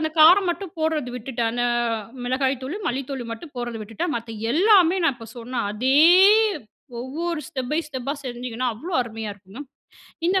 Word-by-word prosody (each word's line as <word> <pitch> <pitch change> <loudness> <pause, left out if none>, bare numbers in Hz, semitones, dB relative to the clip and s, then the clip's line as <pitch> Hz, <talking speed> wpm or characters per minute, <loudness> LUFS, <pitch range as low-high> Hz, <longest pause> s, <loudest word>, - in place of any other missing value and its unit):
அந்த 315 0 -1
காரம் 355 +4 +7
மட்டும் 345 +1 -5
போடுறது 315 -5 -1
விட்டுட்டேன். 240 -1 -2
அந்த 240 +1 -1 0.6
மிளகாய் 260 +1 0
தூளு, 280 +9 -4
மல்லி 260 +3 -1
தூளு 260 -3 -4
மட்டும் 280 +7 -9
போடுறத 240 -2 -4
விட்டுட்டேன். 305 +11 -3
மத்த 230 0 -7 0.2
எல்லாமே, 370 - +5
நான் 300 - +3
இப்போ 225 -1 -11
சொன்ன 240 +1 -3
அதே, 250 +6 0 1.1
ஒவ்வொரு 320 +6 -3
ஸ்டெப் 255 -2 -5
பை 305 - +2
ஸ்டெப்பா, 275 0 -4
செஞ்சீங்கன்னா, 245 0 -3
அவ்வளோ 330 +11 -6
அருமையா 225 -2 -6
இருக்குங்க. 200 +7 -11 0.7
இந்த 380 +1 +3
260 Hz, 160 wpm, -23 LUFS, 240-315 Hz, 1.1 s, காரம்